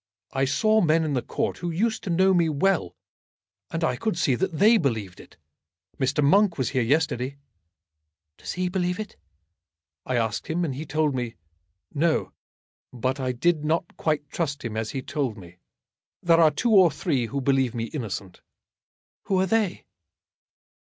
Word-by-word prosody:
I 135 0 +1
saw 215 +11 +3
men 160 -1 +3
in 155 -2 -1
the 125 - 0
Court - - -3
who 175 - -3
used 220 +7 -1
to - - -3
know 190 +3 +4
me 170 -3 +3
well, 155 - 0 0.7
and 165 0 -3
I 160 - +1
could 215 - -2
see 155 -6 +2
that 165 +4 -1
they 220 +5 +6
believed 110 - -2
it. - - -15 0.6
Mr. 140 +2 +1
Monk 195 +5 +4
was 130 -3 0
here 130 -2 +1
yesterday." 135 0 0 1.0
"Does - - -5
he 180 0 -1
believe 180 0 -1
it?" 215 -2 -6 0.9
"I 130 - -2
asked 115 -2 -1
him, 170 +2 0
and 145 - -3
he 145 +4 -6
told 150 0 +1
me 120 -3 -3 0.6
no. 160 +2 +1 0.6
But 130 +2 -2
I 130 -1 -1
did 150 +5 +1
not 165 +3 -1
quite 150 -2 -1
trust 145 -6 -3
him 110 -2 -4
as 110 0 -2
he 135 -2 -4
told 130 -7 -2
me. 90 -2 -13 0.7
There 170 -1 +5
are 160 - +7
two 225 - -1
or 190 -5 +7
three 135 -4 -1
who 140 +4 -3
believe 135 -2 +1
me 115 - -2
innocent." 100 - -6 0.8
"Who 190 -2 +1
are 190 - +3
they?" 205 -1 0
150 Hz, 170 wpm, -25 LUFS, 130-175 Hz, 1.0 s, are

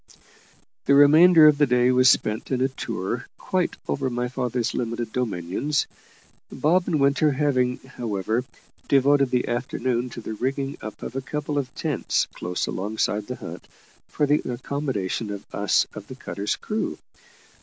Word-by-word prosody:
The 140 - +5
remainder 155 +3 +8
of 150 -1 +6
the 145 - +5
day 125 0 +3
was 130 0 +5
spent 110 -2 +1
in 130 - 0
a 130 +1 +2
tour 115 -2 -4
quite 185 -2 -1
over 135 -1 -1
my 125 0 -2
father's 125 -2 -2
limited 115 -2 -3
dominions, 120 - -1 0.7
Bob 175 +4 +2
and 160 -4 +1
Winter 140 +2 +3
having, 130 -3 +1
however, 115 -3 -3 0.4
devoted 140 0 +4
the 125 -1 0
afternoon 125 0 -1
to 120 - -8
the 110 -1 -6
rigging 135 +4 -2
up 110 - -8
of 125 - -6
a 135 - -1
couple 150 +2 -3
of 130 -2 -4
tents 150 -5 0
close 90 0 -3
alongside 105 +1 -2
the 125 - -4
hut, - - -9 0.4
for 150 - 0
the 145 +1 +2
accommodation 120 -5 -3
of 100 -1 -6
us - - +2
of - - -9
the - - -9
cutter's 100 +1 -3
crew. 215 +1 -3
130 Hz, 155 wpm, -24 LUFS, 115-145 Hz, 0.7 s, remainder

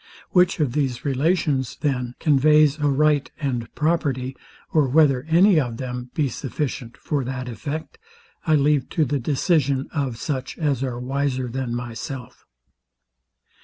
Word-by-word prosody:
Which 180 0 +3
of 140 -6 +1
these 135 -4 -1
relations, 140 -2 0
then, 125 -5 -1
conveys 150 0 +4
a 145 - +1
right 145 0 +2
and 125 -6 -2
property, 140 -5 0 0.4
or 155 -4 +4
whether 140 -1 +3
any 175 +2 +5
of 120 -5 -2
them 125 -1 -5
be 150 -3 +2
sufficient 130 -2 -4
for 145 -3 -2
that 130 0 -4
effect, 145 - -6 0.5
I 155 - +5
leave 145 -2 +2
to 155 - +4
the 140 +1 -1
decision 140 0 +1
of 135 -7 -2
such 135 +1 -4
as 145 -6 0
are 125 -3 -3
wiser 130 0 -1
than 125 -1 -3
myself. 125 +2 -7
140 Hz, 140 wpm, -23 LUFS, 125-150 Hz, 0.5 s, any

